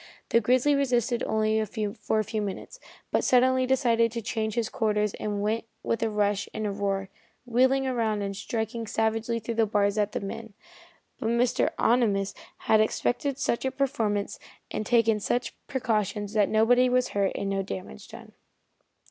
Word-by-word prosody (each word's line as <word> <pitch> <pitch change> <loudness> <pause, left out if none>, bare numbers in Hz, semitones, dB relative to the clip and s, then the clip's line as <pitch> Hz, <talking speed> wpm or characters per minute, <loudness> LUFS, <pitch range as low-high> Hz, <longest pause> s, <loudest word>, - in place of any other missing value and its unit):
The 230 - +4
grizzly 255 +6 +3
resisted 245 -3 +1
for 215 0 0
a - - +1
few 215 +1 -3
minutes, 205 - -6 0.3
but - - +1
suddenly 255 0 +3
decided 235 -3 +2
to 230 - -3
change 220 -1 -2
his 235 -2 0
quarters 210 -2 0
and 205 -1 -2
went 220 +2 -1 0.2
with 230 - -1
a 225 - +1
rush 205 -1 0
and 215 - -2
a 205 - -1
roar, 195 -1 -2 0.4
wheeling 260 +3 +3
about 230 -5 0
and 200 0 -3
striking 225 +2 -3
savagely 225 +2 0
through 230 +1 -4
the 225 -1 +2
bars 205 0 +1
at 210 0 0
the - - -1
men. 205 +1 -7 0.6
But 225 - -1
Mr. 235 +1 +2
Ohnimus 210 -5 +2 0.3
had 215 0 +4
expected 245 +5 0
just - - -3
such 235 - 0
a 265 - +1
performance 235 -7 -1 0.3
and 215 - -3
taken 230 -3 +3
such 240 +4 -1
precautions 210 -5 -1
that 210 -2 +3
nobody 245 +4 +4
was 250 0 +2
hurt 200 -1 0
and 200 0 -2
no 195 0 0
damage 90 - -7
done. - - -12
220 Hz, 170 wpm, -27 LUFS, 210-240 Hz, 0.6 s, The